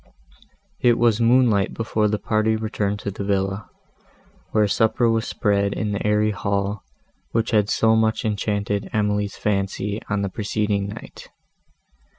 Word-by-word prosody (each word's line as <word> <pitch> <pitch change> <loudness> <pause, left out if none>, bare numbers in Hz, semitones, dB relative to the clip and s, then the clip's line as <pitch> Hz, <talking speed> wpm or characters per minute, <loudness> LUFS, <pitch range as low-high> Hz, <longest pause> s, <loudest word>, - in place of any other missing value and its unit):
It 120 -1 +4
was 115 -1 +3
moonlight 115 -4 +3
before 110 -1 0
the 105 0 0
party 110 +1 +1
returned 105 -2 -2
to 100 - -3
the 100 - -5
villa, 95 +1 -1 0.8
where 105 -1 +2
supper 110 +3 +2
was 115 0 +1
spread 100 -3 +1
in 105 -2 -2
the 100 - -2
airy 105 0 +2
hall, 100 0 -2 0.5
which 115 +1 0
had 105 -2 +2
so 110 0 +3
much 110 0 +1
enchanted 105 -1 -1
Emily's 105 -1 0
fancy, 100 +1 -1
on 105 -1 0
the 100 - -1
preceding 105 -1 -1
night. 105 +3 -10
105 Hz, 145 wpm, -22 LUFS, 100-110 Hz, 0.8 s, It